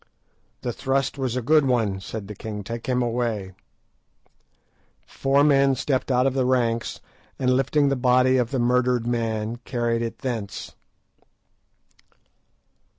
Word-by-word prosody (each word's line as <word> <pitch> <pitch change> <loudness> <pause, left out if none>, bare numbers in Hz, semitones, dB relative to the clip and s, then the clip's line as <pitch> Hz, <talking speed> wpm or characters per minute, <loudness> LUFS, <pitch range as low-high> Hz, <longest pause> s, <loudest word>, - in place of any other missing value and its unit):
"The 120 - -3
thrust 135 +1 -1
was 130 -3 -1
a 125 - -2
good 150 +2 +4
one," 110 -6 +1
said 100 0 -6
the 105 - -6
king; 105 0 -6
"take 115 +3 -6
him 125 -1 +2
away." 115 -5 -2 1.5
Four 140 +1 +1
men 140 -2 +4
stepped 130 0 -1
out 125 0 +3
of 135 - +2
the 130 -1 +1
ranks, 120 -3 0 0.4
and 125 -1 +2
lifting 140 +2 +2
the 140 - +1
body 130 +1 +3
of 120 -2 +1
the 135 - -2
murdered 125 0 +2
man, 115 -1 -2
carried 120 -1 -2
it 115 -1 -4
thence. 110 -6 -5
125 Hz, 140 wpm, -24 LUFS, 115-130 Hz, 1.5 s, good